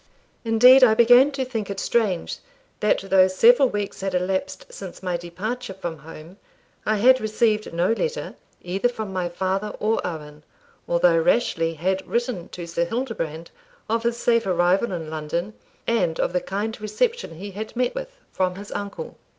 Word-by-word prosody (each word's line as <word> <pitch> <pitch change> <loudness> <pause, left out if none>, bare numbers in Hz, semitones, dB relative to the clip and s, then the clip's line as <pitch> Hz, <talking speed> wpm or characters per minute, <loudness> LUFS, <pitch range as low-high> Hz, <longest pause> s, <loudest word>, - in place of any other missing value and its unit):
Indeed 250 +3 +7
I 220 -3 +6
began 245 +4 +6
to 265 -1 -2
think 225 -5 -4
it 195 -1 -4
strange 205 -7 0 0.4
that 210 - +2
though 190 -1 +6
several 245 +8 +5
weeks 205 -3 -4
had 190 -1 -2
elapsed 190 - -2
since - - -9
my 180 -2 -1
departure 190 +7 -5
from 170 -4 -6
home, 165 +4 -12 0.5
I 215 - +3
had 255 +4 +5
received 215 0 0
no 170 +4 +1
letter, 475 - -2 0.3
either 195 +7 0
from 220 -5 -6
my 180 -2 -1
father 190 +4 -2
or 220 +2 +1
Owen, 150 -3 -6 0.5
although 170 -1 +3
Rashleigh 165 -3 +1
had 185 +4 -1
written 235 -7 -2
to 175 - -7
Sir 170 0 -1
Hildebrand 170 - -4 0.4
of 230 +1 0
his 235 0 -1
safe 230 -3 +1
arrival 180 +4 +2
in 165 -3 -5
London, 165 +6 -3 0.3
and 180 -9 0
of - - 0
the 180 - +1
kind 210 +3 -4
reception 455 - -1
he 200 +5 -8
had 215 +4 -7
met 250 0 0
with - - -5 0.2
from 185 -1 -1
his 200 +1 -9
uncle. 205 - -6
200 Hz, 165 wpm, -23 LUFS, 175-235 Hz, 0.5 s, Indeed